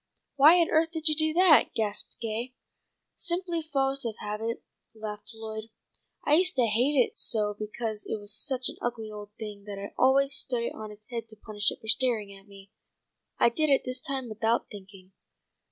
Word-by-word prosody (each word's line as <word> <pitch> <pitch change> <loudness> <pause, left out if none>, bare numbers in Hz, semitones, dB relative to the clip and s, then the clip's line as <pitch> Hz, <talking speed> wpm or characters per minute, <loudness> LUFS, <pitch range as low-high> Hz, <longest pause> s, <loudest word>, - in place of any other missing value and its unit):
"Why 305 +5 +7
on 335 - +2
earth 325 +1 +3
did 320 -1 -2
you - - +4
do 315 0 +3
that?" 350 -2 +5
gasped 210 -2 -2
Gay. 235 +3 -4 0.6
"Simply 345 -1 0
fo'ce 275 -3 +1
of 225 -2 -3
habit," 220 +2 -4 0.3
laughed 210 -1 -7
Lloyd. 220 -1 -6 0.6
"I 290 - +3
used 365 +3 +4
to 250 -3 +3
hate 240 +7 +1
it 245 - +1
so 210 -2 +1
because 215 +1 -5
it 220 - -3
was 205 0 -3
such 255 +3 0
an - - -3
ugly 225 -3 -4
old 210 -1 -8
thing 210 -2 -8
that 205 -1 -7
I 200 +1 -7
always 275 +2 +4
stood 255 -5 0
it - - -3
on 215 -1 -8
its 210 0 -15
head 230 -2 -5
to 215 - -10
punish 210 -1 -1
it - - -7
for 220 - -12
staring 220 -4 +1
at 195 +1 -17
me. 195 0 -15 0.7
I - - +5
did 310 +6 0
it 275 - +4
this 255 0 -1
time 265 -2 -3
without 225 +2 -1
thinking." 195 -2 -12
230 Hz, 195 wpm, -28 LUFS, 210-275 Hz, 0.7 s, Why